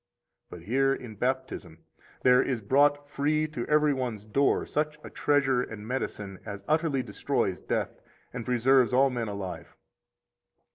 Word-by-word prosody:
But 85 - -10
here 135 +7 +2
in 120 -4 -9
Baptism 130 -8 -3 0.5
there 125 0 +6
is 130 -3 -1
brought 145 +6 +3
free 150 +2 0
to 125 -6 -5
every 150 -1 +3
one's 120 -6 -4
door 135 +6 +2
such 150 0 -2
a - - -9
treasure 140 -3 +2
and 110 -3 -7
medicine 105 -6 -4
as 100 -2 -7
utterly 155 -4 +1
destroys - - -1
death - - -3 0.3
and 125 -2 -4
preserves 125 +1 +3
all 135 +1 +4
men 120 -2 -2
alive. 100 -3 -6
130 Hz, 145 wpm, -28 LUFS, 110-145 Hz, 0.5 s, there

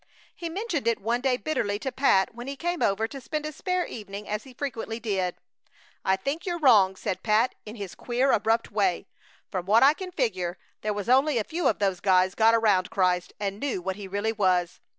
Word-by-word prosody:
He 335 - -5
mentioned 345 - -3
it 230 - +2
one 235 +4 -1
day 255 -1 +2
bitterly 220 -9 -1
to 265 +5 -4
Pat 245 -8 +3
when 240 +2 -8
he 280 - -4
came 345 +4 -3
over 210 +3 +1
to 275 +3 -9
spend 305 +4 -4
a 305 - -3
spare 365 +4 -1
evening, 205 -2 -8
as 210 +3 -3
he 260 - -13
frequently 230 -4 -4
did. 190 -5 -1 0.7
"I 190 - +3
think 275 - -3
you're 350 -2 -2
wrong," 215 - +5
said 190 -1 -3
Pat, 225 +3 +2
in 215 - -7
his 200 -5 -7
queer, 250 +3 0
abrupt 225 +2 +1
way. 195 -3 +1 0.5
"From 185 -1 -3
what 220 +5 +5
I 280 +2 +7
can 370 +3 -7
figure 185 - -1 0.2
there 215 - -1
was 205 0 -4
only 265 +2 +4
a 220 - +1
few 325 +5 -1
of 220 - +2
those 195 -3 0
guys 185 -1 +3
got 225 +2 +4
around 205 -5 +3
Christ 180 -3 +1
and 200 0 -3
knew 275 -7 -2
what 190 +1 -3
he 200 -1 -8
really 205 +3 -1
was! 185 -4 +1
220 Hz, 215 wpm, -26 LUFS, 195-270 Hz, 0.7 s, I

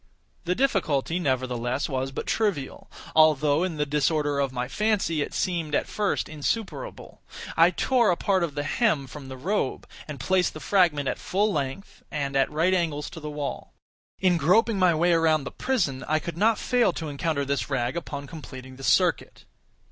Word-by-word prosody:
The 180 +1 0
difficulty, 180 - +1
nevertheless, 130 -3 -1
was 135 -1 -2
but - - -5
trivial; 195 -12 -2 0.3
although, 155 -1 +4
in 180 -4 -2
the 150 - +1
disorder 145 0 +1
of 140 -2 0
my 125 -1 -3
fancy, 200 -2 0
it - - -3
seemed 165 -5 -1
at - - +1
first 205 -2 -1
insuperable. 220 - -4 0.3
I - - +6
tore 245 -5 +2
a 175 - +2
part 190 -3 +1
of 155 -4 -3
the 145 - -1
hem 155 - +1
from 135 +1 -10
the 130 0 -8
robe 170 0 -2 0.2
and 150 -3 -7
placed 185 +5 +1
the - - -6
fragment 160 -7 +2
at - - -2
full 205 +2 0
length, 140 +6 -4
and 140 -2 -3
at 135 -1 +3
right 165 +5 +1
angles 160 -5 -1
to 165 - -8
the 150 -1 -6
wall. 145 -1 -5 0.4
In 180 -2 +3
groping 200 +7 +3
my 180 -3 +4
way 175 +2 +3
around 160 -3 +3
the - - -6
prison, 170 - -1
I 155 - +2
could 165 +1 -5
not 215 +5 +3
fail 245 -2 +2
to 160 - -5
encounter 140 0 -1
this 140 +1 -2
rag 125 0 -1
upon 145 -4 -5
completing 130 -4 -10
the 135 - -11
circuit. - - +1
155 Hz, 185 wpm, -26 LUFS, 140-185 Hz, 0.4 s, I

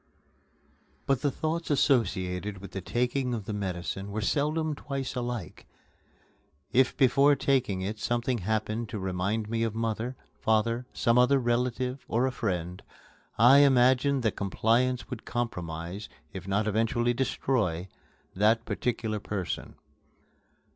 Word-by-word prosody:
But 135 -2 +1
the 145 - +2
thoughts 160 +4 -3
associated 105 - +1
with 100 0 -10
the 95 - -5
taking 125 +4 -1
of 110 -4 -6
the 105 - -4
medicine 95 0 -4
were 110 - -2
seldom 150 +7 0
twice 140 -3 -4
alike. 120 -8 -5 1.1
If 130 +1 +3
before 140 +2 +5
taking 130 -8 +1
it 105 +3 -4
something 120 0 0
happened 110 +3 -2
to 115 - -4
remind 95 +3 -1
me 115 +1 -1
of 115 -1 -1
mother, 115 +2 -2 0.2
father, 115 +3 +1
some 120 0 +2
other 130 +3 +5
relative, 125 +1 -1
or 120 +3 +1
a 130 - 0
friend, 90 -7 -3 0.6
I 125 +6 +8
imagined 130 0 +4
that 110 - +1
compliance 115 +5 +1
would 120 -3 -5
compromise, 90 -4 -4 0.2
if 95 -1 -7
not 100 +2 +1
eventually 115 +3 +1
destroy, 115 -8 0 0.5
that 110 +4 +3
particular 110 -3 -2
person. 100 -3 -4
115 Hz, 130 wpm, -28 LUFS, 105-130 Hz, 1.1 s, I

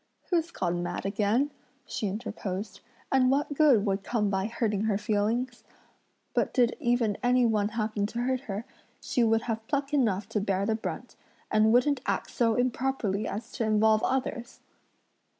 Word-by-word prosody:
"Who's 340 -1 +2
gone 175 - -2
mad 175 +2 -4
again?" 215 +8 +1 0.3
she 215 - -3
interposed, 200 -1 -5 0.3
"and 260 -1 +4
what 285 +2 +1
good 275 -8 +4
would 195 -1 0
come 210 -2 0
by 190 +1 0
hurting 220 -3 -1
her 210 -3 +1
feelings? 220 +4 -1 0.7
But - - 0
did 245 -2 +3
even 240 -4 +1
any 250 0 +3
one 215 -3 +2
happen 215 -2 -1
to 235 +3 -4
hurt 255 +1 0
her, 205 +3 -3 0.3
she 245 - 0
would 225 0 +3
have 225 -1 -4
pluck 280 0 -1
enough 210 -8 +1
to 215 -2 -1
bear 195 -1 0
the 220 - +1
brunt, 220 - -5 0.4
and 215 0 +4
wouldn't 250 +3 +3
act - - -1
so 230 -2 +2
improperly 245 -5 0
as 225 +4 -5
to 240 - -3
involve 215 0 +3
others!" 250 -2 -2
225 Hz, 165 wpm, -28 LUFS, 205-250 Hz, 0.7 s, and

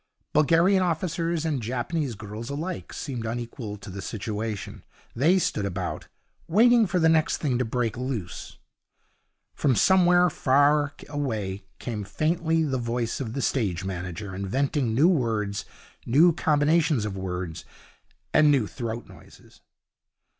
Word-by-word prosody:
Bulgarian 170 +6 +4
officers 170 -1 -1
and 150 -6 -1
Japanese 125 +3 -2
girls 110 +3 -7
alike 160 +6 -4
seemed 130 -7 -5
unequal 115 -1 -5
to 100 0 -10
the 100 +1 -6
situation. 105 0 -5 0.3
They 160 +10 +4
stood 110 - 0
about, 95 -2 -4 0.4
waiting 230 +5 +5
for 180 - 0
the 160 -2 +4
next 160 -1 +3
thing 130 -5 -1
to 125 - +1
break 115 -1 -1
loose. 125 -9 -5 1.0
From 135 -4 +1
somewhere 180 - +5
far 145 +2 +3
away 110 -10 -3
came 110 -4 -4
faintly 160 - 0
the 135 -4 -1
voice 115 -1 -2
of 115 -5 -4
the 135 - -2
stage 95 -9 0
manager 95 +1 -5
inventing 120 +5 -1
new 145 +7 +5
words, 110 - 0 0.4
new 160 +8 +5
combinations 150 -4 +2
of 100 -2 -4
words, 90 -3 -4 0.7
and 150 -1 +6
new 135 -6 +3
throat 115 +1 -5
noises. - - -17
130 Hz, 130 wpm, -26 LUFS, 105-160 Hz, 1.0 s, and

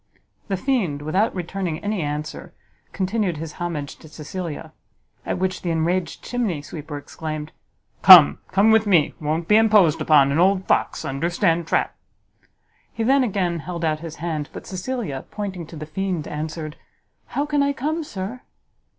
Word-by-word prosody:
The 195 -3 -1
fiend, 185 - -1
without 190 +9 +1
returning 180 -2 -3
any 205 -2 -1
answer, 150 0 -5 0.4
continued 190 -3 -1
his 160 0 -6
homage 155 -5 -4
to 160 - -15
Cecilia; 160 +1 -7 0.5
at - - -1
which 185 0 -2
the 175 - -3
enraged 165 +1 -1
chimney 215 -12 -2
sweeper 150 -1 -7
exclaimed, 155 +1 -6 0.5
"Come, 180 -6 +10
come 200 +4 +4
with 220 -1 +4
me! 170 -7 +3
won't 155 +2 -1
be 210 - +6
imposed 210 -8 +4
upon; 140 -3 +5
an 145 - +1
old 190 +1 +3
fox, - - 0
understand 165 +4 0
trap!" - - 0 1.0
He 230 - -3
then 270 +3 +4
again 185 -7 -1
held 170 +2 -4
out 155 -1 0
his 165 0 -8
hand, 155 -3 -4
but - - -9
Cecilia, 185 - -4
pointing 190 -6 -5
to 165 - -11
the 155 0 -6
fiend, 175 0 -3
answered, 155 0 -5 0.6
"How 285 - +2
can 295 -1 +1
I 280 0 +2
come, 310 +4 -2
sir?" 210 0 -6
175 Hz, 160 wpm, -22 LUFS, 155-205 Hz, 1.0 s, Come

